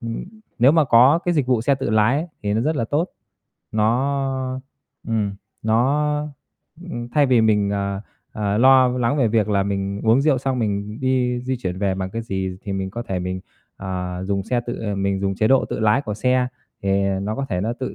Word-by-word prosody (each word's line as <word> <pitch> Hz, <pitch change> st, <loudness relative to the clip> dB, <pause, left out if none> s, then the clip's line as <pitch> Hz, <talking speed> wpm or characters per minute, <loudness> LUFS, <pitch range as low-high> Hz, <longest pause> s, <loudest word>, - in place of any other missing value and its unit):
ừm, 115 Hz, -1 st, -5 dB, 0.3 s
nếu 130 Hz, +4 st, +6 dB
mà 160 Hz, -2 st, +4 dB
có 130 Hz, +5 st, +6 dB
cái 175 Hz, -1 st, +1 dB
dịch 140 Hz, -5 st, +1 dB
vụ 125 Hz, -3 st, +2 dB
xe 140 Hz, +4 st, +2 dB
tự 135 Hz, -, -3 dB
lái 110 Hz, +5 st, +3 dB
ấy, 160 Hz, -, -2 dB, 0.2 s
thì 105 Hz, 0 st, 0 dB
nó 110 Hz, -, +1 dB
rất 155 Hz, +5 st, 0 dB
là 115 Hz, -, 0 dB
tốt. 150 Hz, +9 st, 0 dB, 0.6 s
Nó 130 Hz, +3 st, 0 dB, 0.5 s
ừm, 105 Hz, -3 st, 0 dB, 0.3 s
nó, 150 Hz, +7 st, +1 dB, 0.6 s
ừm, 120 Hz, -6 st, -5 dB
thay 145 Hz, +2 st, +3 dB
vì 125 Hz, -3 st, +4 dB
mình, 105 Hz, -2 st, +2 dB
ờ, 100 Hz, -1 st, -2 dB, 0.3 s
ờ, 105 Hz, -1 st, -1 dB
lo 130 Hz, 0 st, +6 dB
v 125 Hz, -, -3 dB
lắng 125 Hz, +3 st, +1 dB
về 125 Hz, -5 st, +3 dB
việc 110 Hz, -1 st, +1 dB
là 100 Hz, -2 st, +2 dB
mình 100 Hz, 0 st, -2 dB
uống 115 Hz, +4 st, +4 dB
rượu 145 Hz, -4 st, +3 dB
xong 130 Hz, -1 st, -1 dB
mình 105 Hz, 0 st, -2 dB
đi 125 Hz, -2 st, +1 dB
di 130 Hz, +1 st, -2 dB
chuyển 95 Hz, -6 st, -4 dB
về 95 Hz, -1 st, 0 dB
bằng 95 Hz, 0 st, -4 dB
cái 115 Hz, 0 st, -4 dB
gì, 95 Hz, -3 st, -3 dB
thì 100 Hz, -, -4 dB
mình 95 Hz, 0 st, -3 dB
có 120 Hz, +4 st, -5 dB
thể 95 Hz, -5 st, -3 dB
mình, 90 Hz, +1 st, -3 dB, 0.4 s
ờ, 90 Hz, -1 st, -4 dB
dùng 100 Hz, 0 st, -1 dB
xe 120 Hz, +5 st, -1 dB
tự 120 Hz, -, -4 dB
ờ, 105 Hz, -3 st, -2 dB
mình 100 Hz, 0 st, -1 dB
dùng 95 Hz, 0 st, -1 dB
chế 110 Hz, +3 st, +1 dB
độ 135 Hz, -1 st, +4 dB
tự -, -, -4 dB
lái 110 Hz, +6 st, +3 dB
của 105 Hz, -4 st, -4 dB
xe, 125 Hz, +3 st, +1 dB, 0.3 s
thì 100 Hz, -, 0 dB, 0.3 s
nó 105 Hz, +2 st, -2 dB
có 140 Hz, -, -2 dB
thể 90 Hz, -3 st, -1 dB
nó 110 Hz, +5 st, -1 dB
tự, 130 Hz, +1 st, -5 dB
115 Hz, 225 wpm, -22 LUFS, 100-130 Hz, 0.6 s, nếu